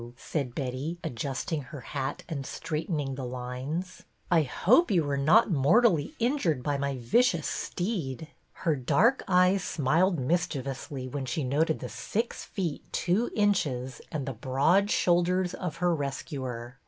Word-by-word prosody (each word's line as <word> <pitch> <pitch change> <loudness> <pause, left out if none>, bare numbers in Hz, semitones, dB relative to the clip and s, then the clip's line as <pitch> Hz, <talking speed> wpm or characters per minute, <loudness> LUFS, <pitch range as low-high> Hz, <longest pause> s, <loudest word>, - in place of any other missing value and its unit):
said 135 -4 -3
Betty, 135 +5 -3
adjusting 135 +5 -3
her 135 +1 -9
hat 135 +2 -4
and 150 -5 -4
straightening 150 -1 -3
the 130 0 -5
lines. 130 +8 -4
" - - -34
I 170 -2 +6
hope 220 - +3
you 175 -5 +3
were 145 -1 -1
not 160 +11 +4
mortally 165 - +3
injured 230 - +1
by 145 0 0
my 140 -1 -1
vicious 165 - +2
steed." 165 - -3 0.4
Her 160 -3 +3
dark 145 - +3
eyes 185 +1 +4
smiled 165 +6 +2
mischievously, 135 -2 -2
when 135 +1 -4
she 125 +5 -1
noted 150 +5 +1
the - - -4
six 230 +3 -3
feet 175 -7 -3
two 195 +7 +1
inches 140 - 0
and 145 -4 -3
the 135 - -2
broad 135 - +2
shoulders 180 0 +2
of 180 -4 -4
her 175 0 +1
rescuer. 135 -4 -4
150 Hz, 145 wpm, -28 LUFS, 135-180 Hz, 0.4 s, I